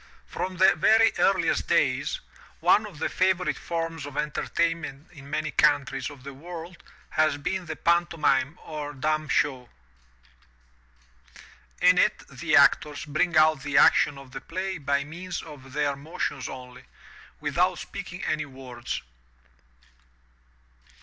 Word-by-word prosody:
From 185 0 -4
the 190 +2 +6
very 220 +7 +4
earliest - - +2
days, - - +1 0.4
one 210 0 +4
of 185 -7 -12
the - - -1
favorite 185 -1 +1
forms 165 -3 -4
of 145 - -10
entertaimnent 155 0 -2
in 140 -4 -13
many 155 +1 -2
coimtries 145 -2 +2
of 140 -3 -13
the 140 0 -8
world 170 +4 -9 0.3
has 155 -2 +2
been 180 +5 -3
the 155 - -4
panto 170 0 +1
mime 140 -1 +2
or 150 -2 -6
dumb 155 +2 -1
show. 130 -4 0 2.1
In - - +6
it - - +1
the - - 0
actors 150 0 +4
bring 155 +3 +1
out 155 -2 +5
the 140 0 -1
action 145 0 +5
of 135 -2 -12
the - - -7
play 185 +1 -4
by 140 0 0
means 175 +4 -6
of 135 -4 -12
their 145 -1 0
motions 140 -2 -4
only, 125 -1 -10 0.5
without 170 +5 +1
speaking 185 -2 -7
any 155 -1 -1
words. 130 - -6
155 Hz, 135 wpm, -26 LUFS, 140-170 Hz, 2.1 s, the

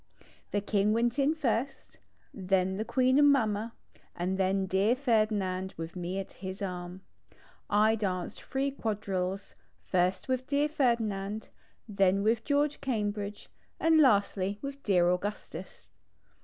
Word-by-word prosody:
The 205 - -1
King 205 0 +1
went 235 +4 +1
in 285 +3 +3
first, 270 -2 -2 0.3
then 190 0 0
the 215 - -1
Queen 255 +3 +3
and 290 -1 +7
Mamma, 225 -4 0 0.4
and 180 +2 -1
then 190 0 +1
dear 195 +5 +2
Ferdinand 215 -7 0
with 165 +2 -6
me 180 +1 -4
at 195 - -5
his 190 0 -7
arm. 180 -1 -5 0.7
I 215 +2 +4
danced 185 -5 -3
3 275 +1 -2
quadrilles; 200 -6 -3 0.4
ist 185 +4 +1
with 255 0 -1
dear 290 +1 +1
Ferdinand, 220 -7 -1 0.4
then 195 -2 +2
with 225 +1 +2
George 290 +1 +1
Cambridge, 210 -5 -3 0.3
and 325 -1 +4
lastly 200 -5 +2
with 280 0 -6
dear 180 -6 +3
Augustus. 180 +4 -4
205 Hz, 130 wpm, -30 LUFS, 190-250 Hz, 0.7 s, and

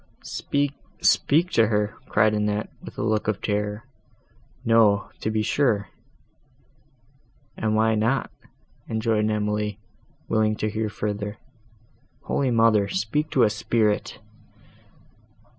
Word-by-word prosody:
"Speak—speak 145 +3 0
to 115 - +4
her!" 105 -1 0 0.2
cried 110 0 +3
Annette, 105 0 -1
with - - -11
a - - -2
look 110 -1 0
of 105 -2 0
terror; 105 +2 -2 0.8
"no, 110 -3 +4
to - - -2
be 110 0 0
sure." 110 -5 +1 1.7
"And 110 0 0
why 110 +1 +3
not?" 115 +5 0 0.6
rejoined 110 -1 +1
Emily, 105 -1 -1 0.5
willing 110 -1 +2
to 110 0 -2
hear 110 0 -2
further. 105 0 -4 0.9
"Holy 135 -2 0
Mother! 115 -3 +4
speak 110 +12 -1
to 130 - +3
a 110 - +5
spirit!" 110 0 0
110 Hz, 110 wpm, -24 LUFS, 105-115 Hz, 1.7 s, a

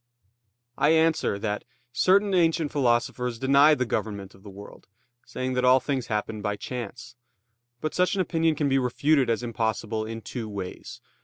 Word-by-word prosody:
I 150 - +4
answer 160 -9 +2
that, 105 0 -3 0.3
Certain 195 +7 +3
ancient 165 -4 +2
philosophers 125 -2 0
denied 140 +4 +5
the 125 - 0
government 100 -4 -4
of 95 - -19
the 100 - -11
world, 100 +1 -13 0.4
saying 130 0 -3
that 125 0 0
all 130 +1 +6
things 130 -3 -3
happened 105 0 -3
by 105 -1 -2
chance. 120 +1 -7 0.7
But 155 - -3
such 180 +2 +1
an 190 - +1
opinion 165 -2 +1
can 150 -1 0
be 135 0 +2
refuted 135 +2 +1
as 115 +1 0
impossible 110 -1 -2
in 115 0 -6
two 115 +1 -6
ways. 95 -3 -7
125 Hz, 165 wpm, -26 LUFS, 110-150 Hz, 0.7 s, all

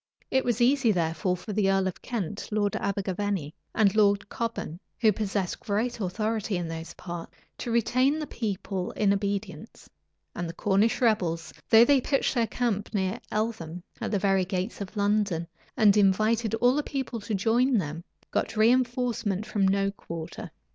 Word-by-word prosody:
It 265 0 +3
was 240 -1 0
easy, 255 -1 +4
therefore, 170 0 0
for 210 +4 -7
the 200 -1 +2
earl 195 0 +2
of 185 - -4
Kent, 210 -4 -4
Lord 205 -1 +1
Abergavenny, 195 -4 -2 0.2
and 210 -2 +3
Lord 200 -2 +3
Cobham, 230 -8 -4 0.2
who 220 -2 +5
possessed 200 -3 -2
great 220 +4 -1
authority 215 +1 -1
in 175 -1 -3
those 165 0 -6
parts, 175 -2 -8 0.2
to 245 - -4
retain 255 +5 +2
the 310 - -3
people 195 -6 -3
in 200 -2 +2
obedience; 200 -1 -4 0.5
and 175 -1 -4
the 170 - -7
Cornish 210 +4 +2
rebels, 180 -8 +1 0.2
though 225 +1 +8
they 275 0 +4
pitched 275 +2 +1
their 235 -3 +1
camp 220 -5 -1
near 190 -1 0
Eltham, 180 -6 -3 0.2
at - - -2
the 210 - +1
very 195 -1 +2
gates 185 +3 -3
of 200 +2 -7
London, 200 -4 +1 0.3
and 210 -4 +6
invited 215 +3 +3
all 245 +3 +4
the 295 - +1
people 265 -5 -4
to 210 0 -3
join 235 +6 +3
them, 165 -2 -3 0.3
got - - +1
reënforcement 235 -3 +1
from 200 -3 +1
no 195 +1 +2
quarter. 165 -4 -7
205 Hz, 165 wpm, -27 LUFS, 190-230 Hz, 0.5 s, though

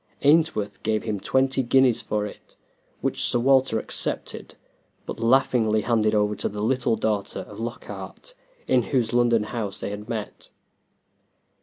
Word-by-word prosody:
Ainsworth 145 -8 +2
gave 110 -1 0
him 105 -2 -2
twenty 130 +5 +1
guineas 130 -1 +3
for 105 -1 -2
it, 105 - -11 0.5
which - - -1
Sir - - +3
Walter 130 -1 +3
accepted, - - -3 0.5
but - - -6
laughingly 115 -3 +3
handed 110 -1 +1
over 105 0 +2
to - - -1
the 105 0 -5
little 125 0 +1
daughter 105 -2 -2
of 105 - -11
Lockhart, 120 - -7 0.3
in 130 - +3
whose 120 +1 -1
London 120 -2 +3
house 105 -2 -4
they - - -4
had 105 +2 -7
met. 110 -3 -6
115 Hz, 145 wpm, -24 LUFS, 105-130 Hz, 0.5 s, guineas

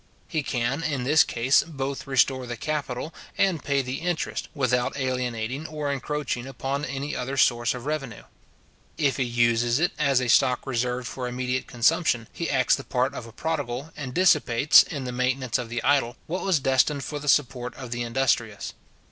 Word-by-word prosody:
He 160 -4 -1
can, 130 +2 -1
in 145 -6 -1
this 155 +6 +5
case, 120 +4 +3
both 140 -3 -5
restore 130 -1 +2
the 120 0 -5
capital, 150 +1 -3 0.2
and 185 -6 +1
pay 140 -1 +1
the 130 +1 -4
interest, 175 -1 -2
without 125 -2 0
alienating 125 +1 -2
or 150 -2 -3
encroaching 140 -2 -3
upon 135 +1 -3
any 140 +2 -4
other 135 +3 -3
source 120 -1 +3
of 125 0 -8
revenue. 140 -7 -4 0.7
If 140 -4 +1
he 135 - +1
uses 120 0 +2
it 175 +3 +2
as 140 -4 +3
a 125 - -1
stock 125 +1 +3
reserved 125 -1 -1
for 125 +1 -4
immediate 125 +1 -2
consumption, 120 -1 +2
he 170 - -3
acts 130 -3 +3
the 140 - -7
part 125 0 0
of 115 - -7
a - - -11
prodigal, 140 +1 -3
and 135 -4 -5
dissipates, 150 -5 +5
in 140 -4 -4
the 125 - -4
maintenance 125 0 0
of 120 -2 -5
the 120 +1 -3
idle, 135 -3 +2
what 180 +4 -3
was 190 -6 +2
destined 135 +1 +2
for 150 +2 -4
the 145 0 -3
support 125 -3 +1
of 125 -3 -8
the 120 0 -2
industrious. 120 -3 0
130 Hz, 180 wpm, -25 LUFS, 125-145 Hz, 0.7 s, this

